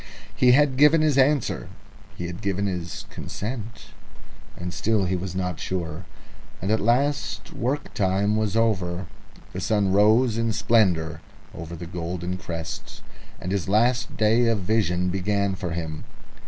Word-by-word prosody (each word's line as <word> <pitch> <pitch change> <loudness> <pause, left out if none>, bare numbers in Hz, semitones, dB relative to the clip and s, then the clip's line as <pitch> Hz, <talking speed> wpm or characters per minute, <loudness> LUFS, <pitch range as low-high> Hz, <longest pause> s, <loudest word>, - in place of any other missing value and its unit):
He 125 -1 +5
had 140 -1 +4
given 150 +3 +6
his 150 -3 +3
answer, 140 -1 +2 0.5
he 90 - -4
had 85 +1 -6
given 100 0 -1
his 90 -4 -4
consent, 115 +1 -6 0.7
and 90 0 -5
still 110 -3 +1
he 90 +1 0
was 90 0 -4
not 90 -3 -2
sure. 85 -1 -4 0.5
And 95 - -2
at 110 - +3
last 120 -3 0
work 135 +5 -2
time 100 +2 +1
was 110 -1 0
over, 95 -6 +1 0.5
the 95 - -4
sun 100 -1 +1
rose 110 +4 +4
in 115 -1 +1
splendour 95 -8 +2 0.3
over 85 +1 -7
the 85 +1 -7
golden 85 +1 -4
crests, 85 -2 -7 0.4
and 90 - -4
his 95 -1 -1
last 120 +4 +2
day 110 +2 +4
of 115 -3 +1
vision 90 -3 +1
began 100 +1 0
for 95 -2 -4
him. 80 -2 -4
100 Hz, 150 wpm, -24 LUFS, 90-115 Hz, 0.7 s, given